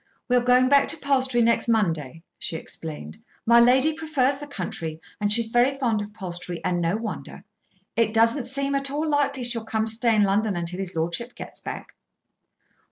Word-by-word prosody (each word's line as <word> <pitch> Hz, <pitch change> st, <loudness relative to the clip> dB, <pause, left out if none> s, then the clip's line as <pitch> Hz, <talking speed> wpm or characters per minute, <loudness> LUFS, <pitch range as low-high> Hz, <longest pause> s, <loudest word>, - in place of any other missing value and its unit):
"We 250 Hz, -, +3 dB
are 245 Hz, -, +4 dB
going 250 Hz, +1 st, +4 dB
back 280 Hz, +1 st, +4 dB
to -, -, 0 dB
Palstrey 260 Hz, -4 st, +1 dB
next 235 Hz, +1 st, +2 dB
Monday," 165 Hz, -, 0 dB, 0.2 s
she -, -, -2 dB
explained. 155 Hz, -, -7 dB, 0.3 s
"My 235 Hz, +1 st, +6 dB
lady 260 Hz, +6 st, +5 dB
prefers 290 Hz, -4 st, 0 dB
the 290 Hz, -, -8 dB
country, 165 Hz, -, -5 dB, 0.2 s
and 205 Hz, 0 st, 0 dB
she 230 Hz, +2 st, +4 dB
is 225 Hz, -, -6 dB
very 250 Hz, +3 st, +3 dB
fond 230 Hz, -6 st, 0 dB
of 205 Hz, 0 st, -7 dB
Palstrey; 175 Hz, -4 st, -5 dB
and 180 Hz, -1 st, 0 dB
no 170 Hz, +3 st, +1 dB
wonder. 220 Hz, -2 st, -7 dB, 0.5 s
It 225 Hz, -1 st, +2 dB
doesn't 230 Hz, +4 st, +2 dB
seem 275 Hz, +2 st, -1 dB
at 275 Hz, 0 st, 0 dB
all 300 Hz, +3 st, -2 dB
likely 280 Hz, -3 st, 0 dB
she'll 235 Hz, -2 st, 0 dB
come 220 Hz, 0 st, -1 dB
to 225 Hz, -, 0 dB
stay 230 Hz, 0 st, +2 dB
in 210 Hz, -, +4 dB
London 200 Hz, +1 st, +1 dB
until 175 Hz, +1 st, -3 dB
his 190 Hz, -3 st, -4 dB
lordship 170 Hz, +10 st, -2 dB
gets -, -, -8 dB
back." -, -, -7 dB
230 Hz, 195 wpm, -24 LUFS, 190-260 Hz, 0.5 s, My